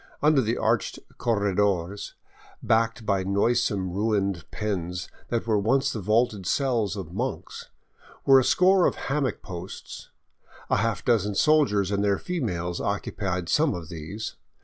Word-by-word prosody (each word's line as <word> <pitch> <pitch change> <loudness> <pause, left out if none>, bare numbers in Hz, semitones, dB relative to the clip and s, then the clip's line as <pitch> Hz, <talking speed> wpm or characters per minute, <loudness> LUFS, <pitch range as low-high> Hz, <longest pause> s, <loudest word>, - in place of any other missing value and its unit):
Under 150 -2 +5
the 115 0 -1
arched 110 -2 0 0.2
corredores, 100 -4 0 0.5
backed 115 +1 +1
by 100 -2 +1
noisome 100 -1 +1
ruined 100 -3 -1
pens 90 -4 -3 0.2
that 115 -1 -1
were 110 -2 +2
once 135 +6 +1
the 110 - -3
vaulted 105 -1 +1
cells 120 -4 +1
of 90 -4 -7
monks, 125 +6 -4 0.6
were 135 -1 +8
a - - +2
score 185 +5 +4
of - - -1
hammock 135 -2 -2
posts. 90 0 -8 0.6
A - - +4
half 115 -2 -1
dozen 105 -4 +2
soldiers 105 -8 +3
and 100 0 0
their 100 -1 +2
females 90 - -3
occupied 95 -3 -2
some 150 - +2
of 85 -3 -7
these. 90 +7 -6
105 Hz, 140 wpm, -26 LUFS, 95-120 Hz, 0.6 s, were